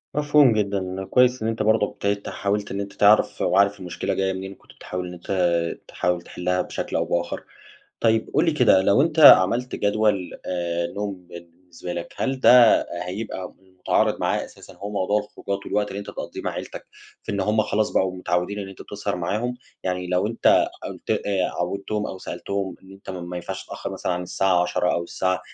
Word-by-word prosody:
مفهوم 145 -3 +5
جدًا، 100 -3 -2
كويس 125 -1 +4
إن 110 - -1
أنت 110 -1 -1
برضه 110 -1 +3
ابتديت 100 0 -3
حاولت 100 +1 -2
إن 100 - -3
أنت 100 0 -7
تعرف، 105 +2 +4
وعارف 100 0 +3
المشكلة 90 -1 -3
جاية 95 0 0
منين، 95 +1 -6
كنت - - -20
بتحاول 90 0 -6
إن 90 - -8
أنت 90 0 0 0.4
تحاول 90 -1 -1
تحلها 90 +1 -2
بشكل - - -5
أو - - +1
بآخر. 85 0 -2 0.6
طيب، 110 -1 +2
قُل 150 +4 +4
لي 165 - +2
كده، 125 -10 +4
لو 100 +7 +4
أنت 160 0 -1
عملت 125 -2 +7
جدول 100 -3 +1 0.2
آآ، 85 -1 -1
نوم 100 -1 -5
بالنسبة 85 +1 -10
لَك، 85 - -6
هل 135 -1 -2
ده 125 -3 +7 0.2
هيبقى 95 -1 -5 0.2
متعارض - - +1
معاه - - 0
أساسًا - - -14
اللي - - -20
هو 105 - -4
موضوع 105 +1 +1
الخروجات 100 -1 -6
والوقت 105 0 0
اللي 100 - -6
أنت 100 - -7
بتقضيه - - -7
مع - - -1
عيلتك، - - -7 0.4
في 115 - -5
إن 100 - -1
هم 105 +2 +2
خلاص 105 0 0
بقوا 95 -1 0
متعودين 90 +3 -1
إن 100 -1 -5
أنت 95 - -10
بتسهر 100 -2 -4
معاهم؟ 110 +8 -2 0.3
يعني 90 -1 -2
لو 90 +2 +1
أنت 115 +1 +3 0.2
قلت - - -7
آآ، 95 -3 0
عودّتهم 100 +4 -2
أو 95 - -7
سألتهم 100 -2 -4
إن 95 0 -15
أنت 95 0 -10
ما 90 -1 -6
ينفعش 85 - -6
تتأخر - - -6
مثلًا - - -2
عن 90 +1 -2
الساعة 90 0 +2
22:00 90 0 0
أو 85 - 0
الساعة 95 +1 -1
100 Hz, 190 wpm, -23 LUFS, 90-105 Hz, 0.6 s, عملت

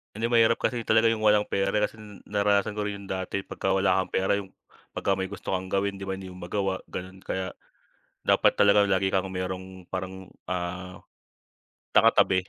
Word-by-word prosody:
Hindi 115 +2 -1
mahirap 115 -1 +4
kasi 120 -2 -1
talaga 110 +1 +4
yung 110 -1 0
walang 105 -1 +4
pera 100 0 0
di 105 - +2
kasi 105 +1 -1 0.3
naranasan 100 0 +1
ko 105 - -1
rin 105 -1 -3
yung 100 - -12
dati 95 +1 -4
pagka 95 - -2
wala 95 -1 +3
kang - - -14
pera 95 +1 +2
yung 100 -2 -5 0.4
pagka 100 - 0
may 95 +1 -3
gusto 95 - -3
kang 95 0 -5
gawin 100 0 0
di 95 - -8
ba 95 0 -3
hindi 95 - -8
mo 90 - -10
magawa, 95 +1 -2
gano'n. 95 +1 -7
Kaya 95 0 -3 0.7
dapat - - +5
talaga 100 0 +6
lagi 95 -1 +2
kang 95 0 0
mayrong 95 0 -5
parang, 95 0 -5 0.2
ah, 90 +1 -4 0.9
nakatabi 95 0 +4
95 Hz, 190 wpm, -27 LUFS, 95-100 Hz, 0.9 s, talaga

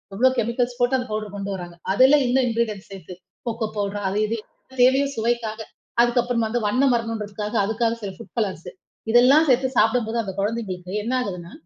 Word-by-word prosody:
எவ்ளோ 255 +6 +4
செமிகல்ஸ் 240 +2 -1
போட்டு 245 +2 +3
அந்த 250 - -5
பௌடெர் 215 -1 -4
கொண்டு 200 0 -4
வராங்க. 175 -2 -8 0.2
அதுல 260 +8 +6
இன்னும் 255 +1 +2
இங்கிரிடென்ட்ச 225 -4 -2
சேத்து 185 -2 -9 0.3
கோகோ 225 -1 -2
பௌடெர் 205 0 -2
அது 190 +2 -2
இது 230 +2 -2 0.5
தேவையும் 275 +2 +3
சுவைக்காக. 230 -1 -1 0.4
அதுக்கப்புறம் 240 -1 +1
வந்து 235 +2 -1
வண்ணம் 255 +5 +3
வரணும்ன்றதுக்காக 215 -2 -4
அதுக்காகச் 230 +2 -1
சில 200 - -3
ஃபுட் 230 - -13
கலர்சு 190 -6 -2 0.4
இதெல்லாம் 255 +7 +6
சேத்து 260 0 +3
சாப்பிடும்போது 225 +1 +2
அந்தக் 195 -4 -4
குழந்தைங்களுக்கு 195 -4 -3
என்ன 240 - -2
ஆகுதுன்னா, 180 -7 -5
230 Hz, 165 wpm, -23 LUFS, 205-245 Hz, 0.5 s, அதுல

